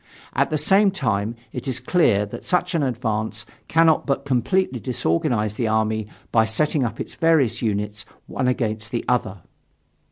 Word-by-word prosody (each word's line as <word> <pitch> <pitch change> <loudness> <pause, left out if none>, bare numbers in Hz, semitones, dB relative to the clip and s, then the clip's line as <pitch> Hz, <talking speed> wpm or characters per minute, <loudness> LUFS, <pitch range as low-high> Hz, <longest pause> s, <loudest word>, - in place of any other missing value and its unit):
At - - +1
the 155 - 0
same 195 +7 +4
time, 115 - -1 0.2
it 125 - -5
is 130 -1 0
clear 125 - +2
that 100 - -9
such 180 +1 0
an 165 - +1
advance 110 -5 -2 0.2
cannot 165 -1 +3
but 135 0 -1
completely 140 +3 +1
disorganize 120 - 0
the 115 - 0
army 110 0 0 0.2
by 110 -1 +4
setting 145 +5 +1
up 115 -2 -3
its - - -5
various 145 -9 +2
units 105 -1 -2 0.2
one 130 - -2
against 110 -4 -1
the 120 -2 -3
other." 105 -6 0
120 Hz, 160 wpm, -22 LUFS, 110-150 Hz, 0.2 s, same